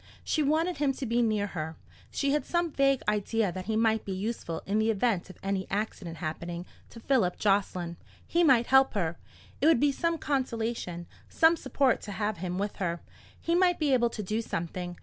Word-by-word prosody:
She 310 - 0
wanted 315 +4 +1
him 280 -2 +1
to 265 - -5
be 235 +1 +1
near 215 -3 +1
her. 160 -5 -5 0.3
She 280 -1 0
had 295 +1 +1
some 345 -1 0
vague 275 -2 +2
idea 210 0 +1
that 185 +1 -6
he 220 - 0
might 220 -1 +2
be 195 - -4
useful 190 -4 -4
in 205 +2 +1
the 220 +1 +2
event 210 -4 +1
of 185 - -12
any 195 -1 -1
accident 195 -5 -3
happening 170 +3 -5 0.2
to 230 - -11
Philip 225 -7 +1
Jocelyn. 185 -4 0 0.3
He 345 +1 +2
might 255 -7 +5
help 265 -1 +4
her. 170 -4 -1 0.4
It 295 - +4
would 325 -7 +5
be 290 +2 +4
some 335 +4 0
consolation, 230 - -2 0.2
some 325 +1 +5
support 275 -5 +1
to 205 - -6
have 205 +2 -2
him 180 +1 -3
with 200 +1 -3
her. 170 -3 -2 0.4
He 335 - -1
might 355 0 +4
be 295 -4 +1
able 240 -2 +3
to 215 -2 -5
do 215 +4 -1
something. 175 -3 -4
220 Hz, 200 wpm, -29 LUFS, 185-275 Hz, 0.4 s, might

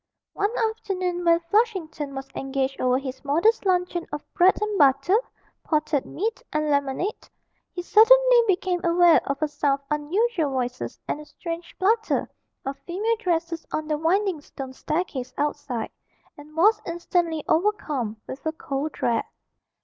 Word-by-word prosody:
One 405 0 0 0.2
afternoon 370 -5 -3
when 335 0 +4
Flushington 335 - -1
was 270 0 -6
engaged 270 0 -2
over 255 0 +3
his 265 0 -6
modest 365 +10 +2
luncheon 360 -2 0
of 295 - -5
bread 365 +2 +4
and 425 0 -1
butter, 275 +6 +4 0.5
potted 305 -3 0
meat, 440 +5 -3
and 305 0 0
lemonade, 280 +8 -1 0.4
he 355 - -5
suddenly - - +6
became 365 -2 0
aware 340 -1 +5
of 280 0 -1
a - - +2
sound 290 -1 0
of - - -37
unusual 335 - 0
voices 250 -1 -3
and - - -2
a - - -11
strange 335 +2 -7
flutter 440 +4 +1 0.4
of 275 +1 -4
female 415 +6 -1
dresses 335 -5 -1
on 310 0 -2
the 305 -1 0
winding 360 0 +1
stone 270 -2 -8
staircase 275 -4 -3
outside 285 -6 -2 0.4
and 300 +2 -14
was 420 +7 +4
instantly 340 -2 -1
overcome 305 - 0
with 265 - -8
a 315 - 0
cold 285 -1 -4
dread. 230 -1 0
325 Hz, 150 wpm, -25 LUFS, 280-375 Hz, 0.5 s, suddenly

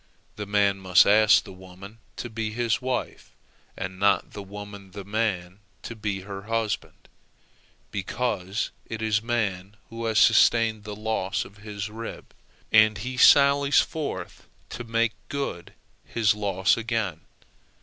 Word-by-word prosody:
The 105 -1 -6
man 100 -1 +2
must 95 -1 +5
ask 105 +1 +5
the 95 - -11
woman 95 +4 -13 0.2
to - - -5
be 110 -1 -3
his 115 +2 -1
wife, 130 -1 -3 0.5
and 95 0 -5
not 100 -2 +2
the 105 - -7
woman 100 -1 -10
the 100 -1 -7
man 100 -3 -2 0.2
to 115 - -7
be 105 -3 -3
her 100 0 -7
husband, 115 -2 -3 0.8
because 100 -1 -2 0.2
it 110 -1 -5
is 110 -1 +1
man 105 -4 -2
who 115 0 -5
has 110 -1 0
sustained 110 -3 +4
the 105 -1 -6
loss 105 -2 -2
of 100 - -15
his 105 -1 -6
rib, 115 +2 -8 0.4
and 110 -1 +5
he 125 +5 -5
sallies 140 +2 +6
forth 140 - -5 0.2
to 120 - -6
make 115 -1 0 0.2
good 135 -12 -4 0.3
his 110 -3 +1
loss 100 -2 +1
again. 110 -8 -2
105 Hz, 140 wpm, -25 LUFS, 100-115 Hz, 0.8 s, sallies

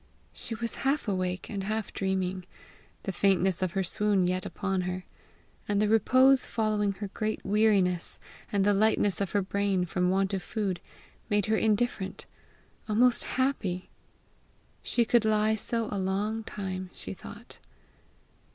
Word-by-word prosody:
She 225 - -5
was 230 +1 -3
half 275 -1 0
awake 185 -2 -2
and 200 -3 -4
half 215 0 -3
dreaming; 190 -1 -2 0.6
the 195 - -2
faintness 190 -1 +2
of 185 -2 -1
her 195 - 0
swoon 200 +1 +1
yet 185 0 -1
upon 195 -2 -2
her, 180 0 -4 0.6
the 205 +1 +2
repose 255 +5 +5
following 210 -3 0
her 200 +1 -6
great 215 +1 -3
weariness, 195 -4 +2 0.3
and 200 -1 +2
the 205 - +4
lightness 205 -2 +3
of 195 - -2
her 205 -1 +2
brain 195 -1 0
from 180 +1 0
want 195 +1 +1
of 190 - -1
food, 195 -3 -2 0.5
made 205 -1 +2
her 220 - +2
indifferent 215 -3 0 0.6
almost 240 +3 +4
happy. 215 -9 -1 0.9
She 235 - +1
could 235 0 +3
lie 215 0 +2
so 225 +1 0
a 205 - -2
long 205 +4 -1
time, 185 -3 -5
she - - -6
thought. 205 +5 -12
200 Hz, 145 wpm, -28 LUFS, 190-220 Hz, 0.9 s, repose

